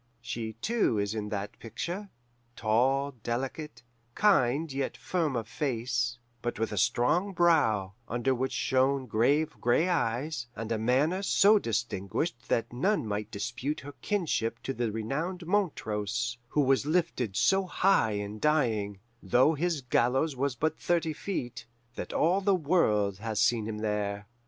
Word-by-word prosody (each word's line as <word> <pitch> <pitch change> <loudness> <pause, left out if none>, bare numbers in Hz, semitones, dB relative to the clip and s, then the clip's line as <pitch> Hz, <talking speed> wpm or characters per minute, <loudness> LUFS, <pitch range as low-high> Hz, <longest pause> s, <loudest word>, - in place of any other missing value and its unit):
She, 115 -1 -5
too, 125 - 0
is 100 0 -1
in 105 -1 -3
that 105 0 -5
picture, 175 - -5 0.5
tall, 130 +6 +2
delicate, 130 +2 -4 0.3
kind 155 -7 +3
yet 135 0 -2
firm 165 -7 -1
of 115 -3 -2
face, 120 -3 -1 0.2
but 120 - -3
with 110 0 -1
a 105 - -4
strong 175 - +2
brow, 145 - +3
under 120 +3 0
which 130 +1 -1
shone 130 +1 +1
grave 135 +8 +2
gray 125 +9 +3
eyes, 130 -3 -1
and 115 +1 -5
a 110 - 0
manner 140 - +2
so 205 +1 +5
distinguished 110 - -2
that 115 +1 0
none 190 - +1
might 105 0 -3
dispute 125 +7 -3
her 145 +1 -9
kinship 145 - -1
to 135 - -2
the 120 -3 -1
renowned 150 - -3
Montrose, 120 - -1
who 150 - +1
was 135 +1 +2
lifted 155 - 0
so 195 - +3
high 180 - +3
in 105 +1 -4
dying, 110 -10 +1 0.2
though 125 - +4
his 160 0 -1
gallows 130 +4 +1
was 135 0 -1
but 155 +5 -1
thirty 165 -2 0
feet, 125 - -5 0.3
that - - -6
all 180 +5 +2
the 200 0 +3
world 105 - +2
has 110 -1 -3
seen 115 -3 +2
him 110 -1 -4
there. 105 -1 -2
125 Hz, 150 wpm, -29 LUFS, 110-155 Hz, 0.5 s, so